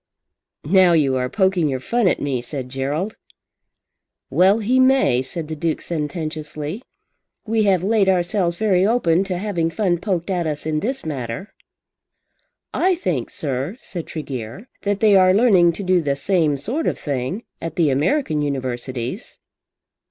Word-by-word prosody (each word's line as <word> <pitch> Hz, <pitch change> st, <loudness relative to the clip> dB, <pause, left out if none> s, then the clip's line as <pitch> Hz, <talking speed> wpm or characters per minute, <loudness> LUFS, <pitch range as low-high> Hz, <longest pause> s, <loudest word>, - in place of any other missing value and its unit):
"Now 185 Hz, +2 st, +5 dB
you 140 Hz, -5 st, +3 dB
are 125 Hz, 0 st, -1 dB
poking 190 Hz, -4 st, +2 dB
your 130 Hz, -1 st, -2 dB
fun 235 Hz, -, +1 dB
at -, -, +2 dB
me," 135 Hz, -4 st, -1 dB
said 125 Hz, +1 st, -6 dB
Gerald. 145 Hz, +10 st, -3 dB, 1.1 s
"Well 190 Hz, +3 st, +4 dB
he 235 Hz, +4 st, +1 dB
may," 260 Hz, -, +4 dB
said 155 Hz, +4 st, -6 dB
the 160 Hz, -, -5 dB
Duke 160 Hz, +1 st, -1 dB
sententiously. 155 Hz, +2 st, -4 dB, 0.6 s
"We 220 Hz, -1 st, +1 dB
have 190 Hz, -3 st, +2 dB
laid 205 Hz, -1 st, +3 dB
ourselves 175 Hz, -1 st, +1 dB
very 190 Hz, -2 st, +2 dB
open 195 Hz, -5 st, +2 dB
to 185 Hz, -2 st, -2 dB
having 175 Hz, -4 st, -1 dB
fun 175 Hz, -2 st, 0 dB
poked 185 Hz, -1 st, -2 dB
at 175 Hz, -3 st, 0 dB
us 150 Hz, -1 st, -4 dB
in 155 Hz, -1 st, 0 dB
this 260 Hz, -, -3 dB
matter." 130 Hz, -, -5 dB, 1.2 s
"I 370 Hz, 0 st, +2 dB
think, 170 Hz, -, -2 dB
sir," 140 Hz, -, -3 dB
said 175 Hz, -10 st, -6 dB
Tregear, 135 Hz, -, -6 dB
"that 205 Hz, +1 st, -1 dB
they 210 Hz, -2 st, +5 dB
are 185 Hz, -1 st, +5 dB
learning 190 Hz, -7 st, +5 dB
to 200 Hz, -, -6 dB
do 185 Hz, -1 st, +3 dB
the 140 Hz, -3 st, 0 dB
same 155 Hz, -1 st, +1 dB
sort 250 Hz, -, -2 dB
of -, -, 0 dB
thing 140 Hz, -, -3 dB, 0.2 s
at 165 Hz, -2 st, -5 dB
the 160 Hz, -5 st, +2 dB
American 155 Hz, -, +1 dB
Universities." 130 Hz, -, -4 dB
170 Hz, 155 wpm, -21 LUFS, 145-200 Hz, 1.2 s, Now